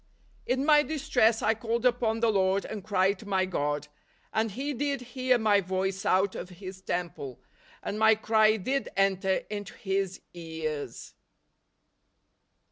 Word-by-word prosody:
" - - -33
In 260 +2 +1
my 300 -1 +6
dist 300 -2 -5
ress 225 -2 +4
I 220 - +4
called 230 +2 -2
upon 235 -2 +2
the 230 -1 +4
Lord, 195 -1 +2
and 210 -3 -6
cried 195 -1 +1
to 215 - -11
my 190 -2 +2
God: 150 -5 -2 0.5
and 220 +1 +1
He 275 +8 -3
did 280 +1 -1
hear 255 -1 +3
my 210 -3 +3
voice 190 +1 -2
out 190 +1 +3
of - - -6
His 185 +1 -9
temple, 170 -8 -4 0.4
and 210 - -3
my 220 0 +6
cry 220 0 +3
did 260 +8 -2
enter 190 -1 +2
into 205 +2 -5
His 195 -2 -2
ears." 160 -6 -5
205 Hz, 155 wpm, -28 LUFS, 185-230 Hz, 0.5 s, my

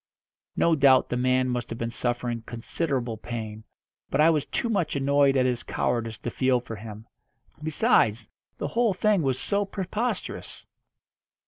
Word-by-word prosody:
No 170 - +3
doubt 135 -3 +5
the - - -1
man 130 +1 +2
must 125 -1 -2
have 115 - -5
been 115 0 -3
suffering 120 -1 -2
considerable 120 -1 -2
pain, 110 -2 -6 0.5
but - - -1
I 160 +2 +6
was 150 -3 0
too - - -1
much 190 -10 0
annoyed 140 0 +3
at 130 - +3
his 125 -1 0
cowardice 115 -2 -2
to 120 - -5
feel 130 0 +2
for 115 -2 -8
him. 110 +1 -9 0.6
Besides, 115 -8 +2 0.3
the 145 - -3
whole 230 +1 +1
thing 210 -1 +2
was 135 -3 0
so 205 0 +1
preposterous. 200 +4 -4
130 Hz, 155 wpm, -26 LUFS, 120-155 Hz, 0.6 s, I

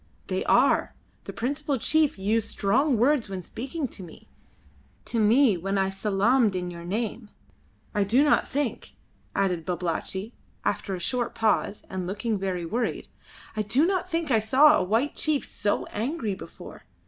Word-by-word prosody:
"They - - -1
are. - - +3 0.3
The - - -5
principal 285 +3 -2
chief 310 +2 +2
used 215 +3 0
strong 255 +7 +2
words 250 -1 +2
when 190 -2 -5
speaking 270 - -4
to 200 - -7
me 170 -3 -12 0.8
to 235 - -2
me 220 0 +4
when 195 +3 -2
I 190 0 +1
salaamed 210 +3 +2
in 180 -1 -3
your 170 -1 -8
name. 215 +4 -3 0.6
I 205 - +2
do 235 +8 +3
not 295 - +3
think," 280 -2 -3 0.4
added 180 -4 0
Babalatchi, 180 +4 -3 0.3
after 195 - -1
a - - -6
short 240 +7 -1
pause 215 -2 +1
and 185 -1 -4
looking 210 +2 -2
very 185 -3 -2
worried 230 +7 -2 0.5
"I 215 - 0
do 245 +9 +2
not 370 0 0
think 330 -4 -1
I 225 - +5
saw 270 +8 +6
a - - +1
white 225 +10 0
chief 305 -3 0
so 205 -1 -1
angry 230 -1 -2
before. - - -11
220 Hz, 160 wpm, -26 LUFS, 195-270 Hz, 0.8 s, saw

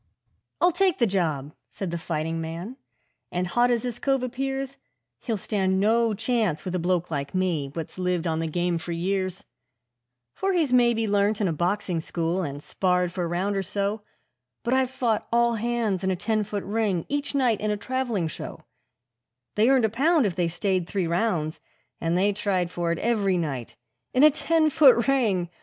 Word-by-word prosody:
'I'll 355 - +4
take 370 0 +2
the 240 - +3
job,' 155 -8 -1 0.2
said 190 -4 -5
the 170 - -2
fighting 165 0 -2
man; 170 +9 -6 0.6
'and 180 +1 -1
hot 240 +8 +2
as 240 -1 +1
this 240 -1 -4
cove 270 -2 +1
appears, 270 +2 -3 0.4
He'll 225 -3 -2
stand 190 -2 0
no 225 +2 +3
chance 220 -6 0
with 180 - -3
a 180 - 0
bloke 175 0 0
like 140 +1 -3
me, 175 -7 0
what's 165 +2 -6
lived 180 -1 0
on 160 -1 0
the 165 - -1
game 175 +1 0
for 170 +1 -5
years; 185 +2 -2 0.9
For 390 0 -1
he's 315 -8 +1
maybe 235 -2 +3
learnt 205 +1 +2
in 205 - +1
a 165 - 0
boxing 175 +2 -1
school, 170 +2 -2
and 145 -3 -5
sparred 180 -2 0
for 175 0 -2
a - - -2
round 185 +4 -1
or 195 - +1
so, 200 +3 -2 0.6
But 240 +2 0
I've 260 -1 +2
fought 235 -4 -1
all 235 0 +3
hands 225 -4 -1
in 190 - +1
a 190 - +1
ten 215 +3 0
foot 205 -1 -4
ring 205 -5 0
each 285 0 -2
night 245 -6 +2
in 215 - 0
a 210 - 0
travelling 235 -5 -1
show; 155 - -7 0.9
They 220 +4 +3
earned 265 -4 +4
a - - +1
pound 285 +5 +3
if 190 -5 -1
they 175 -2 +1
stayed 180 +1 -1
three 195 -2 -1
rounds, 170 -3 0 0.4
and 165 +1 0
they 200 +2 +3
tried 190 -4 -1
for 170 -1 -1
it 170 - -1
every 200 -4 +1
night 140 -8 -3 0.4
In 255 - +5
a 305 - +9
ten 315 +1 +2
foot 270 -6 +6
ring! 205 -11 +1
200 Hz, 190 wpm, -25 LUFS, 175-235 Hz, 0.9 s, a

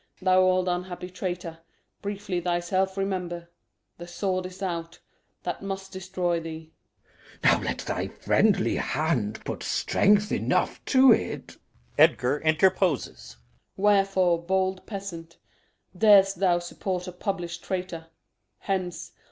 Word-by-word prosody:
Thou 185 -1 +4
old 185 0 +3
unhappy 180 0 -3
traitor, 175 -2 -5 0.4
Briefly 200 -3 -3
thyself 180 +2 0
remember. 180 -3 -3 0.5
The 175 - -8
sword 185 0 -2
is 185 +2 -10
out 170 -2 -4 0.5
That 175 - -4
must 195 0 -5
destroy 185 -2 -2
thee. 160 -1 -8 0.7
Glou. - - +7
Now - - -8
let - - -2
thy - - -3
friendly 200 -3 +2
hand 120 -10 -1
Put - - -4
strength 205 +1 +2
enough - - 0
to't. 260 -3 +3 0.4
[Edgar 130 +4 +4
interposes.] 175 0 +1
Osw. - - -31 0.4
Wherefore, 195 -4 +3
bold 190 +1 -1
peasant, 175 -5 -7 0.6
Dar'st 195 -1 +6
thou 180 -3 +3
support 180 +1 -4
a - - -5
publish'd 180 -2 -4
traitor? 180 -3 -4 0.5
Hence! 185 -3 -3
185 Hz, 120 wpm, -26 LUFS, 175-195 Hz, 0.7 s, Glou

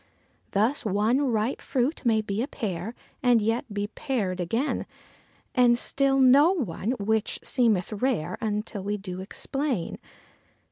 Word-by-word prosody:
Thus, 220 +8 +1
one 215 +6 +2
ripe 220 +4 0
fruit 265 +4 -1
may 225 -3 +3
be 210 0 -2
a 260 - -1
pear, 205 - -4 0.3
and 245 -3 +5
yet 225 +2 -1
be 205 0 -2
pared 215 -6 -2
again, 225 - -1 0.7
And 245 -2 +5
still 270 +2 +2
no 275 +7 +6
one, 230 - -2
which 220 +1 0
seemeth 225 -6 +1
rare 205 -7 -1
until 210 -1 -2
we 205 +1 -1
do 185 -2 -6
explain. 255 - -3
220 Hz, 135 wpm, -26 LUFS, 205-255 Hz, 0.7 s, no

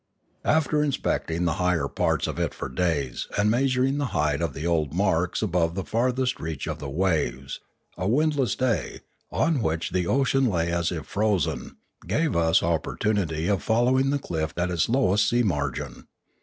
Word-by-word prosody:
After 155 -1 +2
inspecting 90 - -1
the 85 - +1
higher 90 -2 +1
parts - - 0
of - - -4
it - - -1
for - - -5
days 70 -2 -1
and 105 +1 +3
measuring 130 +2 +1
the 140 - 0
height 75 -1 +1
of 80 -5 -2
the 75 - -5
old 80 -3 0
marks 90 -1 +1
above 85 -4 +1
the 95 - -2
farthest 125 +3 0
reach 80 -3 -4
of - - -4
the 70 - -5
waves, 70 -6 -1 0.4
a 90 - -1
windless 140 -1 +2
day, 125 -4 -1 0.3
on 160 -5 +1
which 80 -4 -1
the 90 -2 0
ocean 135 +2 +2
lay 85 -5 0
as 85 -1 0
if 80 -4 -4
frozen, 105 -5 -1 0.3
gave 150 - 0
us 85 +2 +3
opportunity 85 0 0
of 100 -1 +1
fol 115 +2 +2
lowing 130 +1 +3
the 145 - +2
cliff 80 - -3
at 90 +1 0
its 85 +2 +1
lowest 105 -5 +3
sea 120 +1 +2
margin. 75 - -3
90 Hz, 175 wpm, -25 LUFS, 80-125 Hz, 0.4 s, and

